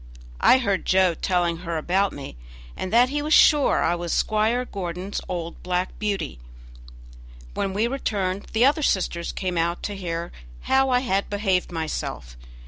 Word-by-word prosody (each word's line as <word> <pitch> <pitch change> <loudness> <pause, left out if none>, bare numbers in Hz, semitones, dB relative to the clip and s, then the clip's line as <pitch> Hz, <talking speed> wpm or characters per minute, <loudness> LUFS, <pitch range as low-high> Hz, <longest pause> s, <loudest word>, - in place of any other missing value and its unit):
I 255 - +6
heard 200 -7 -1
Joe 185 -2 +4
telling 175 -1 0
her 170 -1 -4
about 190 +5 +1
me, 140 - -8 0.4
and 185 - -5
that 240 +3 +5
he 290 +2 -1
was 305 +1 +3
sure 295 -2 +5
I 170 - +2
was 175 -1 -3
Squire 220 +4 +1
Gordon's 185 -1 -5
old 170 -2 -5
"Black 180 0 -2
Beauty". 200 - -2 1.1
When 195 - -2
we 205 +4 0
returned 205 -7 -2
the 225 +3 +3
other 290 +3 +3
sisters 175 - 0
came 180 -3 -2
out 170 +1 -1
to 205 - -3
hear 170 -2 -4 0.3
how 265 0 +2
I 250 -1 +3
had 200 -6 -1
behaved 195 -4 0
myself. 155 - -4
190 Hz, 160 wpm, -24 LUFS, 175-220 Hz, 1.1 s, I